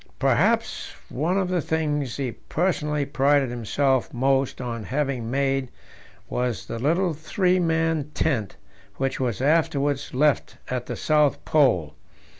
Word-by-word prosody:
Perhaps - - +1
one 165 +8 0
of 190 -2 +1
the 180 -2 0
things 150 -5 -1
he 135 -4 -2
personally 150 -1 -1
prided 140 -1 +2
himself 130 +3 0
most 135 +1 +1
on 120 -3 -4
having 135 -4 -2
made 135 0 0 0.6
was 125 -2 -2
the 115 - -5
little 170 +7 +1
three 180 +4 +1
man 165 -3 +1
tent 115 -11 0 0.4
which 135 +2 -2
was 125 -4 -1
afterwards 145 -2 +1
left 145 +2 +1
at 125 -1 -2
the - - -3
South 150 -2 +2
Pole. 90 - +3
140 Hz, 130 wpm, -24 LUFS, 130-155 Hz, 0.6 s, Pole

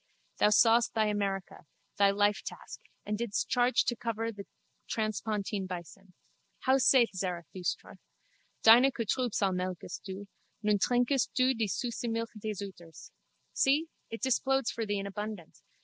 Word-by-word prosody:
Thou - - +5
sawest 230 +2 +4
thy 220 -1 +3
America, 195 -5 -3 0.3
thy 200 0 +5
lifetask, 205 +1 -1 0.3
and 210 0 -2
didst 235 -3 -2
charge 245 0 +3
to 240 - -1
cover 225 -1 -3
like 230 -1 -4
the 200 -1 -8 0.4
transpontine 215 -2 -2
bison. 180 +1 -9 0.5
How 265 +1 +3
saith 255 -2 +5
Zarathustra? 180 -1 -4 0.6
Deine 240 +4 +8
Kuh 235 -3 -4
Trübsal 215 -4 0
melkest 180 -1 -4
Du. 195 +1 -7 0.4
Nun 210 -1 +2
Trinkst 245 +3 +1
Du 255 +1 +3
die 225 -3 -1
süsse 235 +4 -3
Milch 230 0 -2
des 210 -1 -4
Euters. 170 -4 -13 0.4
See! 300 +4 +2 0.2
it 225 +1 -7
displodes 270 0 +1
for 225 -2 -4
thee 205 0 0
in 195 - -3
abundance. 205 -3 -7
215 Hz, 145 wpm, -30 LUFS, 195-235 Hz, 0.6 s, Deine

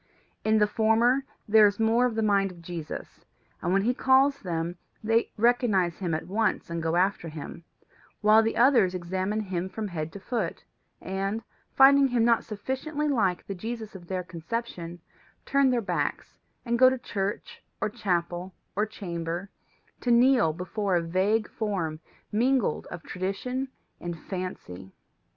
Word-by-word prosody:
In 220 0 +3
the 210 - +5
former 225 +5 +2 0.2
there 215 0 +7
is 200 +1 -2
more 230 +3 +3
of 235 - -4
the 225 - 0
mind 200 -2 +3
of 170 -2 -14
Jesus, 170 -3 -7 0.4
and 175 - -1
when 195 +1 +3
he 245 +3 +2
calls 270 +2 +4
them 170 -3 -3 0.3
they 225 +2 +2
recognize 215 -7 +2
him 175 -4 -1
at 160 - -4
once 210 -2 -1
and 170 0 -2
go 165 +1 0
after 180 -2 +1
him; 155 +2 -8 0.6
while 215 +1 +6
the 225 0 -1
others 235 -7 +5
examine 185 +4 -2
him 185 -2 -3
from 210 +2 -4
head 160 -3 -4
to 200 - -7
foot, 210 -4 -3 0.4
and, 195 +4 -3 0.3
finding 275 +1 +7
him 240 -3 +2
not 235 -1 +3
sufficiently 265 +8 -3
like 205 -11 +1
the 195 - -4
Jesus 220 +3 -6
of 180 -3 -11
their 185 0 -2
conception, 175 0 -5 0.5
turn 275 -1 +3
their 245 -2 +2
backs, 205 - -3 0.3
and 235 0 0
go 255 0 +8
to 260 - -1
church, 205 -5 -4 0.2
or 215 - 0
chapel, 180 -2 -2 0.2
or 210 +2 +1
chamber, 175 -2 -5 0.5
to 245 - -3
kneel 240 -7 +5
before 185 +3 -2
a 170 - +2
vague 195 +6 +1
form 180 -8 -3 0.3
mingled 240 - +1
of 175 - -8
tradition 200 +8 -3 0.3
and 175 -1 -5
fancy. 125 - -7
205 Hz, 160 wpm, -27 LUFS, 175-235 Hz, 0.6 s, go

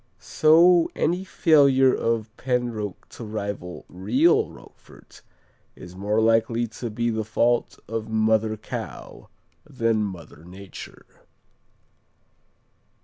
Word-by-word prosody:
So 170 +2 +4
any 175 +4 0
failure 140 -8 +4
of 115 -1 -2
Penroque 120 -7 -3
to - - -10
rival 100 -4 -6
real 120 - +2
Roquefort - - -17 0.5
is 90 0 -12
more 105 +3 -1
likely 115 +1 +2
to 115 +1 -7
be 120 +2 -1
the 110 0 -2
fault 120 +2 0
of 110 -1 -4
mother 110 0 +1
cow 105 - -8 0.3
than 115 -7 -1
mother 85 -6 -8
nature. 95 +2 -11
110 Hz, 100 wpm, -24 LUFS, 105-125 Hz, 0.5 s, So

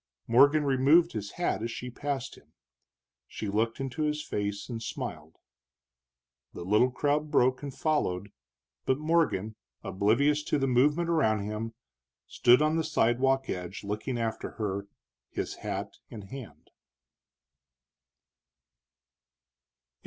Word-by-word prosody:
Morgan 145 +6 +5
removed 140 +6 +4
his 105 -2 -5
hat 175 -10 -1
as 115 - -2
she 125 +2 -6
passed 135 0 -3
him. - - -19 0.7
She 105 - -5
looked 110 +4 0
into 135 +2 -4
his 150 0 0
face 100 0 -3
and 115 -3 -5
smiled. 90 - -6 1.2
The - - -6
little 105 +6 +4
crowd 145 +4 0
broke 130 -3 +3
and 145 -1 -5
followed, 105 - -1 0.6
but 130 - +3
Morgan, 150 - +1 0.3
oblivious 120 +10 +2
to - - +1
the 135 - +1
movement 145 +7 +3
around 125 -11 +2
him, 110 +2 -4 0.5
stood 125 +4 +4
on 155 +1 +2
the 165 - +1
sidewalk 135 -2 +2
edge 90 +3 -5
looking 105 +5 -3
after 115 -1 -3
her, 100 -2 -3 0.4
his - - -4
hat - - -5
in 110 - -8
his 95 - -15
hand. 110 - -10
125 Hz, 125 wpm, -29 LUFS, 105-145 Hz, 1.2 s, Morgan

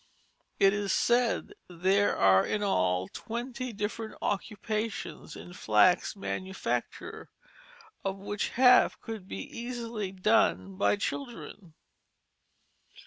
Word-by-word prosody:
It 195 0 +5
is 205 -1 -1
said 240 - +2 0.2
there 190 +4 +2
are 95 -1 +5
in 210 - -1
all 90 - +1
twenty 245 - -5
different 215 +1 -4
occupations 210 +2 -3
in 175 - -10
flax 175 - +3
manufacture, 190 -1 -4 0.7
of 195 0 -2
which 205 +1 -3
half 250 0 +5
can 220 -4 -7
be 95 - -6
easily 230 -4 -4
done 195 0 +2
by 195 - +2
children. 205 - -6
205 Hz, 100 wpm, -29 LUFS, 185-230 Hz, 0.7 s, It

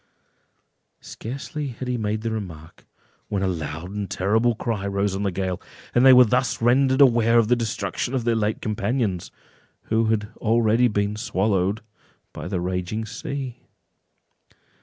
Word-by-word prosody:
Scarcely 140 +5 -6
had 125 0 -6
he 125 - 0
made 110 -1 -2
the 115 - -1
remark, 85 -8 -7 0.4
when 100 -2 -1
a - - +2
loud 80 0 -4
and 100 -2 -4
terrible 110 +6 +1
cry 105 -3 -2
rose 100 0 0
on 95 - -3
the 100 - +1
gale, 95 -1 -3 0.3
and 120 - +4
they 135 - +9
were 125 -1 +8
thus 125 +3 0
rendered 130 +3 +3
aware 120 -3 +5
of 115 -2 +3
the 125 - +5
destruction 120 +2 -2
of 125 - -1
their 120 0 +2
late 110 -1 -1
companions, 105 -3 -1 0.6
who 115 +1 +3
had 110 -1 0
already 115 +1 +3
been 105 -1 -1
swallowed 100 -2 0 0.5
by - - -6
the 90 - -2
raging 90 +5 -2
sea. 125 +3 -5
110 Hz, 155 wpm, -23 LUFS, 100-120 Hz, 0.6 s, they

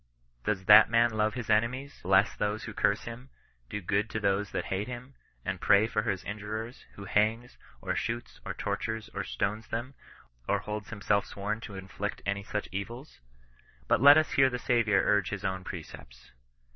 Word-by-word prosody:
Does 95 -3 -1
that 105 +1 +9
man 115 +1 +4
love 110 0 0
his 125 -3 -5
enemies, 125 +6 0
bless 95 +3 +3
those 105 +1 -2
who 110 - -7
curse 100 +1 +1
him, 120 +3 -9 0.4
do 105 - -4
good 100 +4 0
to 110 - -3
those 100 0 +1
that - - -3
hate 100 +3 -2
him, 125 +2 -8 0.3
and 95 -1 -3
pray 105 +1 +5
for 110 -1 0
his 95 -3 -2
injurers, 110 +3 -6
who 100 - -9
hangs, 110 +5 +1 0.3
or - - -1
shoots, 120 +1 -4
or - - -5
tortures, 110 -1 -3
or - - -3
stones 105 +3 -2
them, 120 +4 -4 0.5
cr - - +2
holds 105 -1 -5
himself 100 -1 0
sworn 105 +2 -3
to 105 -4 -8
inflict 95 +2 -5
any 100 0 -1
such 105 +1 -3
evils 115 +9 -6
1 - - -37 0.7
But - - +3
let 140 +2 +9
us 155 0 +2
hear 135 -1 +5
the 125 - -3
Saviour 115 -5 +2
urge 100 -3 +2
his 105 -1 -5
own 95 -1 -2
precepts. 75 -9 -10
105 Hz, 185 wpm, -29 LUFS, 100-115 Hz, 0.7 s, that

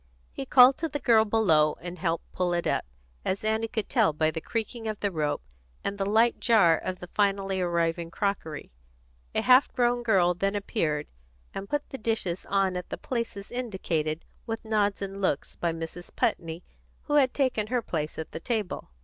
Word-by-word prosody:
He 135 - -6
called 255 +1 +7
to 325 0 -2
the 290 - -2
girl 225 -5 +4
below, 165 -9 +3
and 175 +1 -7
helped 165 -2 -2
pull 180 -1 0
it 170 0 0
up, - - 0 0.4
as 190 +2 -2
Annie 220 +1 0
could 220 -3 -3
tell 160 - +3
by 155 +1 +1
the 160 - -5
creaking 225 +2 -3
of 215 -1 -3
the 205 - 0
rope, 150 - -1 0.4
and 200 +1 -3
the 195 - 0
light 225 +3 +3
jar 205 -9 +5
of 185 +3 -4
the 180 - -8
finally 195 -2 +1
arriving 170 -1 0
crockery. 170 -5 -3 0.6
A - - +2
half 255 +2 +5
grown 245 -1 +2
girl 190 -7 +3
then 195 +3 -1
appeared, 165 -8 -1 0.5
and 195 - -6
put 290 0 -1
the 270 - -6
dishes 215 -6 -2
on 195 -2 +1
at 180 -1 -5
the - - -4
places 230 -5 -4
indicated 175 -10 -2 0.2
with 225 0 -4
nods 205 -2 +1
and 195 0 -5
looks 170 -7 -1
by 170 - -1
Mrs. 165 +2 -7
Putney, 165 +1 -1 0.4
who 295 - -3
had 265 -3 +4
taken 255 -6 0
her 245 0 0
place 155 -5 -3
at 160 - -6
the - - -5
table. 215 - -3
195 Hz, 190 wpm, -27 LUFS, 170-225 Hz, 0.6 s, called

